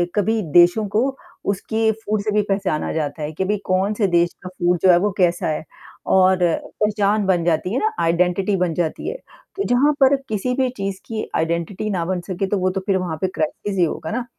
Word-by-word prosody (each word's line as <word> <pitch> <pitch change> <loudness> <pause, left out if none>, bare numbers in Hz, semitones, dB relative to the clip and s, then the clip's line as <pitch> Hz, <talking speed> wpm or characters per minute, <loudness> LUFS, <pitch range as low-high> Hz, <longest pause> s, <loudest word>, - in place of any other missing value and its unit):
कभी 220 +2 +1
देशों 175 +5 +5
को 260 +6 0 0.3
उसकी 220 +3 0
फूड 215 0 0
से 215 - -1
भी 210 0 +3
पहचाना 195 -6 -1
जाता 155 0 -3
है 150 - -3
कि 190 +5 -2
भाई 210 +2 0
कौन 190 +3 +1
से 205 -1 +1
देश 175 -1 +2
का 185 - -6
फूड 180 -1 0
जो 185 - +7
है 175 - +6
वो 205 +3 +1
कैसा 175 -2 +2
है 155 0 -2 0.5
और 185 0 +5 0.5
पहचान 210 0 +1
बन 180 -3 +2
जाती 175 +3 0
है 255 - +1
ना 435 - +1
आइडेंटिटी 180 +4 +1
बन 180 -2 0
जाती 160 -1 -2
है। 470 - -5 0.4
तो 395 - -1
जहाँ 255 +5 +4
पर 270 +1 +6
किसी 220 +4 -1
भी 260 -1 +1
चीज़ 195 -1 -3
की 220 -1 -4
आइडेंटिटी 170 +6 -1
ना 180 -5 -1
बन 180 0 -2
सके, 185 +2 -3
तो 205 - 0
वो 185 0 +1
तो 190 +1 -3
फिर 195 -2 +2
वहाँ 175 -4 -3
पे 190 - +2
क्राइसिस 195 +6 -2
ही 180 - +4
होगा 155 - -4
ना। 240 +2 -2
190 Hz, 220 wpm, -21 LUFS, 175-210 Hz, 0.5 s, जो